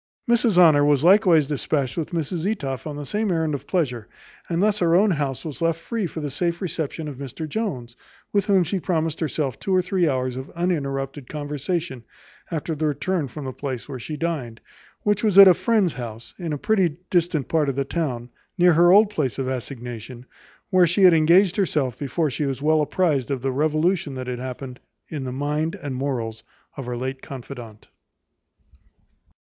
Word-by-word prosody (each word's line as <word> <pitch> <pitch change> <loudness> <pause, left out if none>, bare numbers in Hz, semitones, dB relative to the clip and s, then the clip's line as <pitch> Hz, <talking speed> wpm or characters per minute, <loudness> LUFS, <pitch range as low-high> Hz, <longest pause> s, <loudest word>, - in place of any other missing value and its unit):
Mrs 235 -4 +3
Honour 155 -5 +7
was 145 -1 +3
likewise 180 -4 +5
despatched 140 -3 -1
with 160 - -3
Mrs 170 +1 -2
Etoff 135 - -4
on 150 - -5
the 145 0 -6
same 210 +4 -1
errand 160 -3 0
of 140 - -5
pleasure; 125 - -1 0.4
and 170 -1 0
thus 210 0 +2
her 170 -1 +3
own 200 +3 +4
house 140 -4 -2
was 155 0 -6
left 165 -1 +1
free 205 +3 -3
for 160 - -6
the 145 -2 -4
safe 170 +4 -1
reception 160 -4 -3
of 145 -3 -7
Mr 140 +4 -6
Jones, 140 - -4 0.4
with 200 -2 +2
whom 195 -3 +4
she 190 +3 -2
promised 165 -3 -1
herself 150 -5 -2
two 190 - 0
or 185 - +4
three 180 -2 +1
hours 130 -2 -1
of 130 +2 -6
uninterrupted 140 -6 -2
conversation 150 -1 -3 0.5
after 165 -1 -3
her 155 +1 0
return 150 +2 -1
from 140 +3 -8
the 130 - -4
place 130 -4 -5
where 135 -3 -6
she 150 +6 -6
dined, 145 -9 -3 0.4
which 210 0 +1
was 210 -3 +2
at 200 -1 +12
a 185 - +8
friend's 210 -3 +1
house 115 -2 -8
in 170 -3 -4
a 150 - -1
pretty 180 -3 +1
distant 170 -5 +1
part 155 -3 +1
of 135 - -2
the 140 0 -1
town, 130 -7 -3 0.3
near 175 -1 +5
her 175 +2 +6
old 205 +2 +6
place 150 - -1
of 135 -1 -2
assignation, 125 -2 -6 0.5
where 185 -2 +5
she 180 +4 +2
had 180 -2 +8
engaged 170 +5 +4
herself 150 - 0
before 145 +2 -1
she 145 +3 -2
was 135 -1 -3
well 155 +2 +3
apprized 150 -4 0
of 135 -3 -3
the 135 - 0
revolution 155 +2 0
that 130 0 -5
had 125 -1 -4
happened 130 0 -7 0.3
in 145 -4 -5
the 130 - -4
mind 150 +4 -1
and 145 -3 -6
morals 120 -4 -3 0.3
of 135 -4 -7
her 120 -1 -3
late 130 +2 -4
confidante. 120 -5 -9
150 Hz, 195 wpm, -23 LUFS, 135-175 Hz, 0.5 s, at